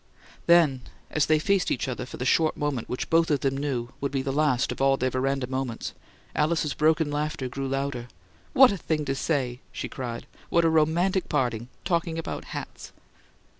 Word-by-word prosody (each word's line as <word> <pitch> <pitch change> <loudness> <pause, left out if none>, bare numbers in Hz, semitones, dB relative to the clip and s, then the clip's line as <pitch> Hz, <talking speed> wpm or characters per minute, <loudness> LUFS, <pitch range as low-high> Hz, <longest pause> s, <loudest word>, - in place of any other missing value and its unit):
Then, 165 -7 +5 0.3
as 155 - +2
they 155 - +4
faced 195 +4 +1
each 130 - -1
other 125 -1 -4
for - - -8
the 125 - -3
short 155 +4 +3
moment 145 -6 -2
which 125 - -4
both 165 0 +4
of 145 -4 +1
them 135 -1 +1
knew 135 -4 -2
would 140 - -1
be 135 -1 -1
the 135 - -1
last 145 -4 +2
of - - -5
all 135 0 +4
their 130 0 0
veranda 135 +1 0
moments, 130 -2 -3 0.4
Alice's 150 -1 +1
broken 155 0 +2
laughter 150 -2 -2
grew 135 +2 -4
louder. 135 -2 -2 0.5
"What 260 -3 +8
a 200 - -2
thing 155 -3 -1
to 135 - 0
say!" 135 -4 -1
she - - -4
cried. 120 -3 -5 0.2
"What 170 -1 +3
a 165 - +4
romantic 170 +5 +2
parting 120 -5 0 0.2
talking 170 -2 0
about 165 - -4
HATS!" - - -8
140 Hz, 190 wpm, -26 LUFS, 130-160 Hz, 0.5 s, What